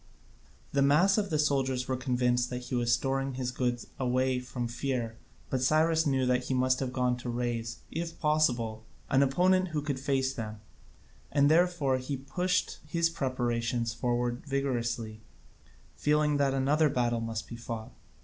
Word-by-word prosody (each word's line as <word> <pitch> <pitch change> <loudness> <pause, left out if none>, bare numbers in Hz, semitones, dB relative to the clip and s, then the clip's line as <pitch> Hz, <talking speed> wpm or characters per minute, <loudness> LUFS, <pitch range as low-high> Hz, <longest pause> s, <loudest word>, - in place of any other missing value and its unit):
The 140 - +2
mass 175 +9 +4
of 200 -2 -2
the 155 - +1
soldiers 135 -4 +1
were 130 - 0
convinced 125 -1 +1
that 125 0 -5
he 125 - -7
was 120 -1 +1
storing 135 +2 0
his 125 -1 -2
goods 125 -1 -1
away 130 0 +1
from 125 -1 -4
fear, 120 -1 -2 0.4
but 130 - 0
Cyrus 160 +3 +3
knew 135 -2 +2
that 125 0 +1
he 130 - -1
must 130 0 +2
have 130 -2 -2
gone 125 -1 +1
to 125 0 -6
raise, 120 -1 -2
if 165 +1 -4
possible, 120 -8 +1 0.3
an 135 - +5
opponent 185 +7 +3
who 155 -4 -2
could 140 -3 -2
face 135 -1 0
them, 110 -3 -6 0.7
and 145 0 +4
therefore 160 -6 +3
he 135 +2 -4
pushed 180 +7 -1
his 165 +1 +1
preparations 120 -5 -1
forward 120 +1 -1
vigorously, 120 -5 -2 0.7
feeling 150 0 +2
that 140 -1 +2
another 145 +3 +3
battle 120 -3 0
must 115 -1 -4
be 120 - -7
fought. 115 -1 -6
130 Hz, 160 wpm, -30 LUFS, 120-145 Hz, 0.7 s, an